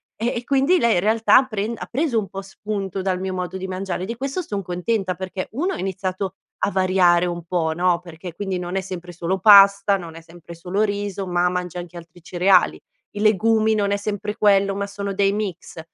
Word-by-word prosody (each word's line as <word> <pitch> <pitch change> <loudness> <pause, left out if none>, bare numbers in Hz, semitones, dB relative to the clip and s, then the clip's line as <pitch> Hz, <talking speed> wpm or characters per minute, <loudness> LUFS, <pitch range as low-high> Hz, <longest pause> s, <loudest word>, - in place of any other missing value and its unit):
Eh, 230 +3 -1
e 240 - -4
quindi 280 +6 +3
lei 235 -3 +3
in - - +3
realtà 225 +6 +4
pren 215 -1 -3
ha - - -6
preso 270 -2 0
un 210 - -1
po' 195 +2 -7
spunto 195 -1 -5
dal 185 -1 -1
mio 190 0 -3
modo 180 +1 -4
di 190 0 -4
mangiare 185 -1 -4
e - - -2
di 230 - -4
questo 275 +8 -3
son 205 - -4
contenta 185 +2 -2
perché 185 +1 -5
1 345 - -1
ha - - -5
iniziato 190 0 -3 0.3
a 200 - +2
variare 185 -2 +3
un 175 -1 -5
po', 165 -2 -1
no, 175 0 +2
perché 170 0 -10
quindi 190 0 -3
non 180 +1 -5
è 195 - 0
sempre 180 -2 -7
solo 175 +3 -2
pasta, 200 0 +7
non 170 -4 -7
è 165 - -10
sempre 170 0 -13
solo 180 +5 -2
riso 200 -2 -2
ma 175 0 +1
mangia 180 -1 -4
anche 175 0 -8
altri 170 0 -14
cereali; 180 +1 +2 0.3
i 205 - -8
legumi 220 +1 +3
non 200 -1 0
è 200 - +1
sempre 210 0 -4
quello 200 -1 +3
ma 200 0 -3
sono 200 0 -5
dei 195 0 +2
mix, 195 -6 -5
195 Hz, 220 wpm, -22 LUFS, 180-205 Hz, 0.3 s, pasta